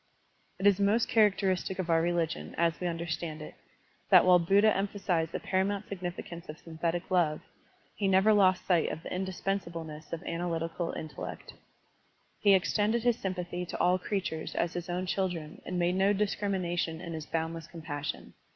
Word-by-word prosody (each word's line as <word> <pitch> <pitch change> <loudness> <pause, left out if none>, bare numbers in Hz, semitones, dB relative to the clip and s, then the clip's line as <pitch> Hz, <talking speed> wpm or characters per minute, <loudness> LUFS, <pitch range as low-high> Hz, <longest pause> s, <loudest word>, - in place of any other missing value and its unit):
It 190 - -4
is 205 -1 +5
most 205 +3 +3
characteristic 195 -4 +2
of 185 -3 -2
our 165 0 +4
religion, 165 - -1
as 170 0 +1
we 180 - -1
tmderstand 165 -2 -3
it, 155 - -8 0.6
that - - +8
while 180 -1 +7
Buddha 200 +5 +4
emphasized 195 -5 -1
the - - -3
paramount 195 +2 -1
significance 175 -2 -6
of 155 - -7
synthetic 170 +2 -3
love, 165 -4 +2 0.5
he 200 - 0
never 195 +3 +5
lost 185 -3 +4
sight 175 -4 +3
of 160 - -6
the - - -5
indispensableness 170 -4 -4
of 165 - -4
analjrt 170 -1 -2
ical 170 0 -3
intellect. 155 -3 -7 0.9
He 200 -1 +6
extended 210 +5 +1
his 240 -1 +2
sympathy 180 -2 -3
to 180 - -6
all 180 +1 +3
creatures 180 -4 -3
as 170 0 0
his 175 0 -5
own 180 +1 -1
children 175 -5 -2
and 180 - -2
made 175 0 +2
no 195 +2 +3
dis 205 0 +1
crimination 175 -5 -1
in 170 -1 -6
his 155 -2 -6
boundless 165 0 -3
compassion. 150 -4 -6
175 Hz, 170 wpm, -30 LUFS, 165-195 Hz, 0.9 s, that